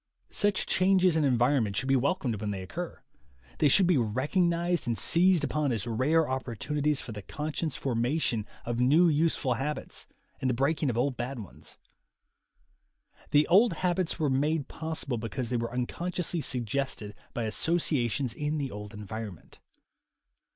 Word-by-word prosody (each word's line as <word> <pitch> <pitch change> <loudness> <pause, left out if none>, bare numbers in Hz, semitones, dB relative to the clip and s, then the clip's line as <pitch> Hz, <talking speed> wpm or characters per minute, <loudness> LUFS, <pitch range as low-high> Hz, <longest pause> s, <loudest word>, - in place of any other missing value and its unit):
Such 205 -2 +1
changes 185 -2 +3
in 160 - +2
environment 120 -5 +2
should 130 - -1
be 135 - +4
welcomed 130 - 0
when 105 - -2
they 95 -2 -4
occur; 165 - -6 0.6
they 150 - +5
should 185 +7 +5
be 175 -6 +3
recognized 170 - 0
and 115 -2 0
seized 175 -1 +4
upon 150 -1 0
as 115 -3 -2
rare 140 +8 +2
opportunities 135 +3 -1
for - - -7
the 105 -1 -6
conscious 150 - -4
formation 120 -3 0 0.2
of 120 0 -2
new 150 +8 +5
useful 150 -4 +1
habits 140 +5 -4 0.3
and 130 - 0
the 125 - +1
breaking 140 +3 +1
of 115 - -2
old 130 +1 0
bad 125 +2 -4
ones. 105 -7 -10 1.5
The 150 +1 +4
old 205 +7 +5
habits 180 -1 0
were 155 -3 +1
made 145 +2 +1
possible 150 -6 -4
because 120 +2 -4
they 125 - +1
were 115 0 -3
unconsciously 170 +7 -2
suggested 125 -4 -2 0.2
by 115 - -1
asso 160 +9 0
ciations 130 -6 0
in 150 +3 -2
the 140 -3 -3
old 105 +1 -8
environment. 105 -3 -8
135 Hz, 155 wpm, -29 LUFS, 120-160 Hz, 1.5 s, they